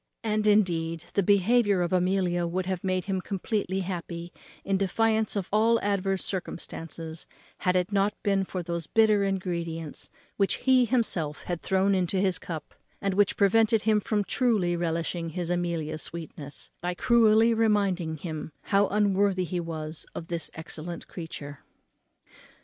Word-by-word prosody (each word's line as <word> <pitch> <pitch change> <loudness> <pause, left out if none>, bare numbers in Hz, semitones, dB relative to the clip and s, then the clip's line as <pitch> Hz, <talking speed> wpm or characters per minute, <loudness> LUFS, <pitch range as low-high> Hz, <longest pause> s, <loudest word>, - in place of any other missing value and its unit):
And, 215 -1 0
indeed, 165 -6 +2
the 200 - +3
behaviour 205 0 +3
of 175 - -2
Amelia 180 -1 +1
would 180 +2 -2
have 185 -2 -3
made 185 -1 0
him 190 -1 -1
completely 195 -1 -2
happy, 175 -2 -5 0.3
in 195 - +1
defiance 220 +3 +1
of 195 -3 -2
all 225 +2 +4
adverse 195 -1 0
circumstances, 165 -3 -5 0.3
had 180 -2 +1
it 180 +2 +1
not 200 +1 +2
been 195 -1 +2
for 185 -1 -4
those 170 -1 -4
bitter 215 -2 +4
ingredients 170 -5 -3 0.3
which 195 -1 +2
he 260 -1 +4
himself 190 - 0
had 175 -2 -3
thrown 190 +1 +2
into 185 0 +1
his 190 -1 +2
cup, 160 -4 -7 0.3
and 195 -1 -1
which 200 +1 +2
prevented 220 +2 +4
him 215 -1 +3
from 210 0 0
truly 205 -7 +1
relishing 170 0 -2
his 175 +1 -3
Amelia's 170 -3 -2
sweetness, 155 -4 -7
by 180 +1 -2
cruelly 230 +1 +5
reminding 200 -7 +1
him 155 -1 -6
how 200 0 +3
unworthy 200 -2 +2
he 180 0 -2
was 160 -2 -4
of 165 - -6
this 170 -2 -1
excellent 160 +1 -7
creature. 145 -5 -7
185 Hz, 150 wpm, -27 LUFS, 170-205 Hz, 0.3 s, cruelly